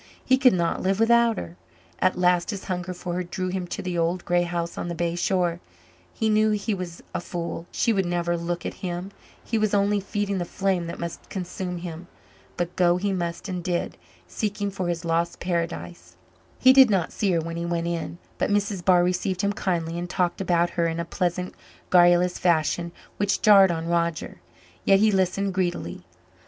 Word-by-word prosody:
He 260 0 +4
could 255 -2 +6
not 170 -2 0
live 190 +2 0
without 235 -1 +4
her. 85 +1 -7 0.4
At 185 - +2
last 180 -1 +2
his 200 -3 -4
hunger 180 -1 -3
for 180 0 -5
her 180 +1 -1
drew 185 +1 -4
him 180 -1 -3
to - - -5
the 180 -2 -2
old 170 +2 0
grey 175 0 +2
house 170 -1 -3
on - - -4
the 170 - -4
bay 170 0 -1
shore. 175 -1 0 0.5
He 220 - -1
knew 215 0 +3
he 210 +1 0
was 180 -3 -6
a - - -2
fool 170 -1 -5
she 230 - +1
would 195 -3 0
never 175 0 0
look 170 0 -3
at - - -3
him; 180 +1 -4 0.3
he 225 - -1
was 215 -1 +1
only 205 +1 +2
feeding 200 -1 -2
the - - 0
flame 185 -1 -1
that 170 - -6
must 170 -1 -6
consume 180 -1 -4
him. 170 0 -7 0.5
But 175 0 -2
go 175 -1 +3
he 195 +1 -1
must 170 +1 -3
and 180 -2 -4
did, 175 0 -2 0.3
seeking 205 -1 -2
for 190 -2 -3
his 170 0 -2
lost 170 +1 0
paradise. 175 0 -4 0.4
He 260 0 +6
did 265 -2 +8
not 190 -5 0
see 200 -3 +1
her 170 - +2
when 165 +1 -5
he 170 - -3
went 170 -1 -1
in, 170 0 -3 0.2
but - - +1
Mrs. 205 -2 0
Barr 180 -1 +5
received 180 +1 0
him 200 0 +1
kindly 170 -3 -2
and 175 0 -5
talked 180 0 0
about 175 -2 +2
her 170 -2 +1
in 165 0 -2
a 170 - -2
pleasant 180 +1 -2 0.4
garrulous 175 0 +5
fashion 170 0 +1 0.3
which 205 0 0
jarred 200 -3 +7
on 165 -1 -2
Roger, 170 - -1 0.4
yet 195 - +5
he 215 +1 +4
listened 195 0 +1
greedily. 175 - -2
180 Hz, 200 wpm, -25 LUFS, 170-195 Hz, 0.5 s, did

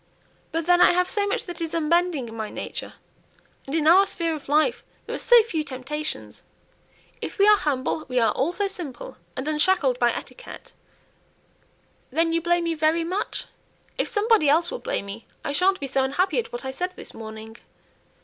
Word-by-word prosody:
But 330 0 -2
then 355 0 +4
I - - +7
have 360 +1 +1
so 410 -2 +3
much 405 - -1
that 345 -2 -8
is 330 0 -3
unbending 330 -4 +1
in 225 - -9
my 220 -1 -4
nature, - - -6 0.7
and 275 - -3
in 315 -2 +1
our 375 +5 +6
sphere 335 -3 0
of 295 -3 -8
life 310 +11 +2 0.2
there - - -6
are - - -2
so 480 -2 +6
few 330 -9 -2
temptations. 295 +2 -6 0.8
If - - -6
we 400 0 +5
are 420 - +8
humble, 295 -2 -1
we 255 -1 -3
are 225 -2 +3
also 345 +9 0
simple, 330 -10 -7 0.2
and 260 - -4
unshackled 300 -4 +2
by 240 -1 +4
etiquette." - - -9 1.4
"Then 330 +4 +1
you 335 - +1
blame 345 +1 +1
me 335 -1 0
very 315 +1 +1
much? 370 +5 -3 0.5
If - - -1
somebody 430 -7 +3
else 330 +4 +3
will - - -4
blame - - -3
me, 200 +3 -9 0.2
I - - -1
sha'n't 375 +6 +2
be 280 - -3
so 270 0 0
unhappy 355 - +1
at 465 - -4
what 240 +2 -6
I 265 - -2
said 360 +7 -3
this - - -10
morning." 220 0 -9
320 Hz, 190 wpm, -24 LUFS, 270-360 Hz, 1.4 s, are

